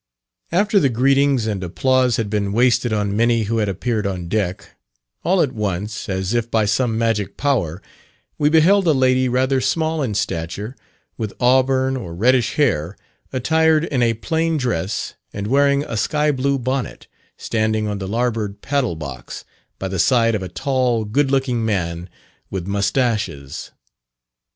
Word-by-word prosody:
After 200 +4 +3
the 140 - +3
greetings 135 0 +2
and 100 -4 -2
applause 130 +7 +1
had 115 - -1
been 100 -1 -1
wasted 120 0 +2
on 105 -2 0
many 115 0 +2
who 115 +2 -1
had 105 -2 0
appeared 105 +2 -1
on 90 -3 -4
deck, 95 -3 -2 0.5
all 180 +1 +3
at 140 - -1
once, 105 -2 -3
as 95 +2 -2
if 120 -1 0
by 110 -2 +2
some 110 +2 +1
magic 115 -4 -1
power, 100 - -1 0.6
we 150 - +3
beheld 175 +5 +4
a 160 - +5
lady 130 -1 +2
rather 130 +2 +1
small 160 +4 0
in 115 -7 -2
stature, 95 +7 -3 0.4
with 110 -3 -4
auburn 130 +1 +3
or 90 -10 -6
reddish 120 +5 +2
hair, 95 - 0 0.3
attired 160 +4 +2
in 140 -6 -1
a 115 -1 +2
plain 160 +7 -1
dress, 110 - -2 0.2
and 100 0 -4
wearing 140 +4 +3
a 115 - -5
sky 150 +7 +1
blue 140 0 0
bonnet, 130 -1 -3 0.3
standing 110 -1 -1
on 105 -1 -3
the 95 - -4
larboard 110 -2 -2
paddle 135 -9 0
box, 70 -6 -8 0.3
by 95 - -4
the 95 -1 -3
side 115 0 +3
of 105 - -1
a 95 - -5
tall 125 -2 0
good 135 +7 +1
looking 130 -4 0
man, 90 -5 -2 0.4
with 95 -3 -4
mustaches. 100 - -1
115 Hz, 160 wpm, -20 LUFS, 100-135 Hz, 0.6 s, a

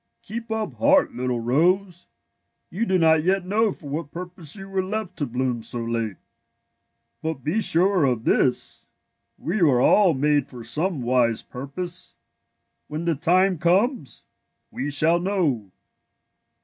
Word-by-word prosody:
*^ - - -19
Keep 230 +2 -6
up 220 -1 -2
heart, 285 0 +4
little 125 -1 -2
rose. 175 +9 +1 0.6
You 225 +5 -2
do 185 - +3
not 160 -2 +4
yet 190 +1 +1
know 210 +3 +2
for 160 - -11
w^hat 145 +1 -4
purpose 175 -2 -6
you 195 -1 -9
were 195 -1 -1
left 195 -1 -4
to 145 - -2
bloom 125 0 -2
so 115 +1 -4
late. 115 -3 -2 1.1
But 160 -5 -4
be 175 +11 0
sure 180 -3 +3
of 120 -4 0
this: 125 +1 0 0.5
we 175 +6 -3
w^ere 145 - +4
all 190 -7 +5
made 145 0 +1
for 125 -2 -10
some 150 +5 -1
wise 120 -2 +1
purpose. 170 +8 -7 0.7
When 155 +3 -5
the 170 - +2
time 180 +4 +2
comes, 195 - 0 0.5
we 140 - -3
shall 160 +4 +3
know." 170 - -1
165 Hz, 150 wpm, -24 LUFS, 130-190 Hz, 1.1 s, all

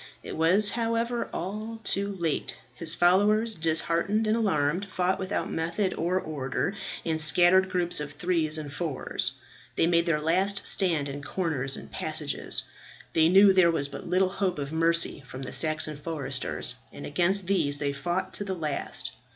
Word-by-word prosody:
It - - -6
was, 190 +6 +4
however, 230 +1 -1
all 215 +5 -5
too 200 0 -1
late: 165 -4 -2 0.2
his 160 +6 -2
followers, 210 +6 +3
disheartened 170 +5 0
and 215 +1 +2
alarmed, 180 -4 0
fought 185 0 0
without 190 0 -3
method 170 +4 -1
or 180 +3 0
order 150 +2 -3 0.3
in 160 -1 0
scattered 175 +4 +5
groups 175 -3 0
of 145 -1 -5
threes 160 -1 +2
and 145 -2 -6
fours. 150 -3 -3 0.4
They - - +3
made 170 0 +2
their 160 -3 +2
last 190 +6 +1
stand 165 -7 +2
in 140 +1 -6
corners 145 -5 +1
and - - -10
passages. - - -1 0.5
They 160 0 +4
knew 195 +2 +7
there 185 -2 +5
was 145 -4 -1
but - - -8
little 185 +2 +2
hope 190 -2 -1
of 145 +1 -5
mercy 165 -2 +1
from 130 +2 -8
the - - -6
Saxon 155 -1 +1
foresters, 140 -5 -3 0.2
and - - -9
against 180 +6 +1
these 165 -7 +1
they 145 -1 -2
fought 175 +6 -3
to - - -1
the 190 -2 -3
last. 155 -4 -2
170 Hz, 165 wpm, -27 LUFS, 155-190 Hz, 0.5 s, knew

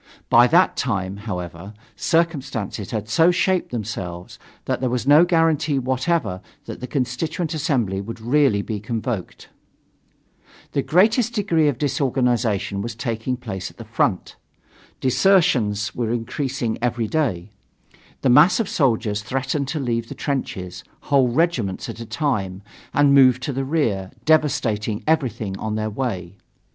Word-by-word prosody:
By 120 +1 +7
that 175 +7 +4
time, 100 -7 -2
however, 95 -1 -6 0.2
circumstances 135 - -1
had 110 -2 -3
so 165 +9 +4
shaped 185 0 +1
themselves 95 -6 -6 0.3
that - - -2
there 130 - +1
was 125 0 -2
no 150 +5 +7
guarantee 165 -4 +2
whatever 130 - -1 0.2
that - - -7
the 125 - -6
Constituent 150 +6 -2
Assembly 125 - 0
would 115 +3 -7
really 120 -3 +2
be 105 -1 -4
convoked. 110 -2 -5 1.2
The 140 - 0
greatest 220 - +3
degree 170 -8 +2
of 140 -5 0
disorganization 125 - 0
was 115 +2 -5
taking 120 +1 -3
place 100 -5 -6
at - - -20
the 115 - -9
front. 110 -4 -1 0.6
Desertions 125 - +2
were 115 -2 -2
increasing 120 0 -2
every 120 -1 0
day; 105 - -1 0.7
the 130 - +3
masses 150 - +6
of 220 - -4
soldiers 110 -7 +1
threatened 135 +4 -2
to 155 +3 -3
leave 115 -3 -2
the - - -7
trenches, 95 -10 -4 0.3
whole 135 -2 +5
regiments 120 - 0
at - - -7
a 115 - -7
time, 105 -8 -2 0.3
and 145 -1 +4
move 130 -2 +6
to 140 - -3
the 135 +1 -2
rear, 115 - 0 0.2
devastating 115 -9 +1
everything 115 -10 0
on 110 0 -3
their 110 0 -2
way. 100 -7 -4
125 Hz, 140 wpm, -22 LUFS, 105-145 Hz, 1.2 s, By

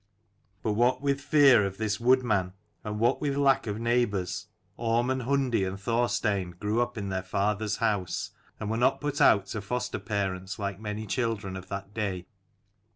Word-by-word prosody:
But 110 - +1
what 125 +5 +2
with 140 -1 +1
fear 140 -6 +6
of 95 -1 -3
this 105 -2 -1
wood 130 +2 +4
man, 95 -6 0 0.3
and 105 0 -4
what 120 +4 +2
with 140 -2 -1
lack 135 -3 +3
of 105 +1 -3
neighbours, 115 -6 0 0.3
Orm 120 +2 +1
and 130 0 -1
Hundi 130 -4 +1
and 95 +1 -3
Thorstein 105 -5 0
grew 105 +3 0
up 120 -1 -2
in 100 -2 -3
their 95 -1 -1
father's 105 +2 -1
house, 100 -5 -1 0.3
and 105 - -3
were 115 - 0
not 120 - +2
put 145 -1 -2
out 100 -2 +6
to 110 - -3
foster 125 +4 -3
parents 95 -2 -3
like 100 -2 -4
many 105 0 -4
children 110 -5 -2
of 95 0 -8
that 100 +1 -6
day. 100 -5 -3
110 Hz, 180 wpm, -28 LUFS, 100-120 Hz, 0.3 s, fear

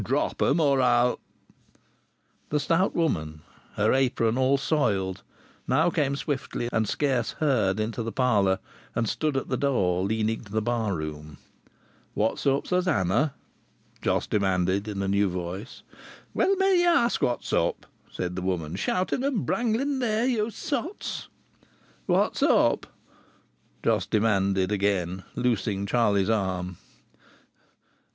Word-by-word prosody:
"Drop - - -1
'em! 155 - +3
Or 140 -4 +3
I'll 125 0 +3 0.7
" - - -41
The 150 - +1
stout 165 +6 +1
woman, 80 - -1 0.3
her 105 +1 +2
apron 120 -4 +2
all 130 +2 +3
soiled, 100 - 0 0.5
now - - +3
came 140 -2 0
swiftly 135 -4 -3
and 110 -2 +1
scarce 130 -6 0
heard 110 -10 +1
into 110 +2 -2
the 115 0 -3
parlour, 105 -8 +2 0.4
and 115 -1 0
stood 150 +4 -1
at 135 - -3
the - - 0
door 95 -10 +1
leading 110 +2 0
to 105 - -15
the 110 - +1
bar 110 -3 -1
room. 75 -2 -6 0.8
"What's 110 +6 0
up, 135 +1 +2
Susannah?" 145 - +1 0.7
Jos - - +1
demanded 95 0 0
in 100 -2 -3
a - - -1
new 100 0 +2
voice. 90 +6 -6 0.5
"Well 395 - +2
may 385 -1 +3
ye 350 - +3
ask 290 -9 +3
what's 120 - -1
up!" - - 0 0.2
said 90 0 -4
the 95 - -3
woman. 90 -2 -2
"Shouting 185 - -1
and 275 -6 0
brangling 245 +4 0
there, 225 -2 +1
ye 230 -4 +1
sots!" 310 - -4 0.8
"What's - - +1
up?" - - +3 1.0
Jos - - +2
demanded 100 -3 +1
again, 95 -3 0
loosing 105 -5 0
Charlie's 100 -3 +2
arm. 95 -5 -1
110 Hz, 135 wpm, -26 LUFS, 95-145 Hz, 1.0 s, em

